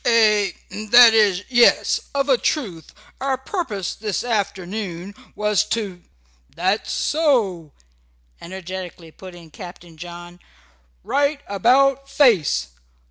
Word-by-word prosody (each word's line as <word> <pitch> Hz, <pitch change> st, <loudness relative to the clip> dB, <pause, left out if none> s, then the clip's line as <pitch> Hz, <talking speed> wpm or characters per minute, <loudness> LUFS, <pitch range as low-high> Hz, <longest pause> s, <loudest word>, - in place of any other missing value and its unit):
"A 210 Hz, -4 st, +3 dB, 0.3 s
that 240 Hz, 0 st, +8 dB
is 205 Hz, -4 st, +3 dB
yes, 240 Hz, -2 st, +3 dB
of 275 Hz, 0 st, 0 dB
a 270 Hz, -, +4 dB
truth 200 Hz, -, -3 dB, 0.3 s
our 270 Hz, -1 st, -1 dB
purpose 260 Hz, -, -4 dB
this 210 Hz, -3 st, -4 dB
afternoon 200 Hz, -4 st, -4 dB, 0.2 s
was 210 Hz, -1 st, +1 dB
to 210 Hz, -5 st, -4 dB, 0.3 s
" -, -, -35 dB
"That's 185 Hz, +5 st, -1 dB
so!" 225 Hz, -, 0 dB, 0.7 s
energetically 180 Hz, -2 st, -8 dB
put 185 Hz, +2 st, -12 dB
in 165 Hz, -2 st, -15 dB
Captain 175 Hz, -2 st, -12 dB
John. 175 Hz, +1 st, -10 dB, 0.6 s
"Right 285 Hz, 0 st, 0 dB
about 270 Hz, +7 st, +2 dB
face! 180 Hz, -, +2 dB
205 Hz, 110 wpm, -21 LUFS, 175-245 Hz, 0.7 s, that